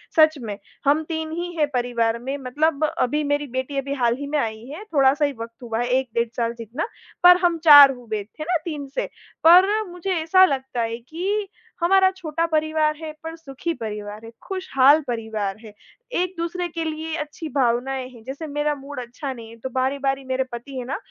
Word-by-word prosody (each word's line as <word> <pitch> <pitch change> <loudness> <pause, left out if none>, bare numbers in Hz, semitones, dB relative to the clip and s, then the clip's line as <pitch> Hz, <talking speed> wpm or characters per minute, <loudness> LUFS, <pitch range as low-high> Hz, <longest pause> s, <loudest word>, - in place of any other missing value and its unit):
सच 310 -1 +5
में, 210 -3 -5 0.3
हम 295 +3 +3
3 320 -1 -3
ही 350 +2 -3
हैं 300 -1 +3
परिवार 235 -2 0
में, 265 +3 -4
मतलब 290 +4 0
अभी 300 -1 0
मेरी 290 0 0
बेटी 260 +3 -4
अभी 275 +1 -2
हाल 240 -3 +1
ही 285 - -5
में 300 +1 -1
आई 220 -2 -3
है, 305 +10 -8
थोड़ा-सा 285 -5 +3
ही 285 - -1
वक़्त 230 +1 -8
हुआ 225 -1 -3
है 245 - 0
1 260 -2 -5
डेढ़ 235 0 +1
साल 235 0 0
जितना, 235 - -4 0.4
पर 360 0 +9
हम 345 -1 +3
4 290 -3 +10
हुए, 235 -4 -5 0.2
है - - -2
ना, 350 0 +2
3 295 -4 -4
से। - - 0 0.4
पर 380 +6 +7
मुझे 360 +2 -4
ऐसा 370 +4 +6
लगता 265 -5 -2
है 230 0 -2
कि 375 - -3 0.3
हमारा 380 +2 +5
छोटा 330 -1 -1
परिवार 310 -1 +1
है 315 -1 -6
पर 325 0 -6
सुखी 325 +1 -5
परिवार 210 -3 -6
है, 225 - -10 0.2
खुशहाल 310 -6 +4
परिवार 220 -4 -3
है, 215 -2 -11 0.4
एक-दूसरे 355 0 -2
के 330 0 -4
लिए 315 0 -3
अच्छी 300 +1 -6
भावनाएँ 255 +1 +1
हैं। 240 -3 -15
जैसे 280 +5 -6
मेरा 295 +1 0
मूड 275 -1 -8
अच्छा 255 +3 -6
नहीं 230 -2 -10
है, 230 - -12
तो 260 - -5
बारी-बारी 270 +1 -1
मेरे 260 0 0
पति 255 +3 -7
हैं 245 - -4
ना, 275 - -3
280 Hz, 200 wpm, -23 LUFS, 245-320 Hz, 0.4 s, 4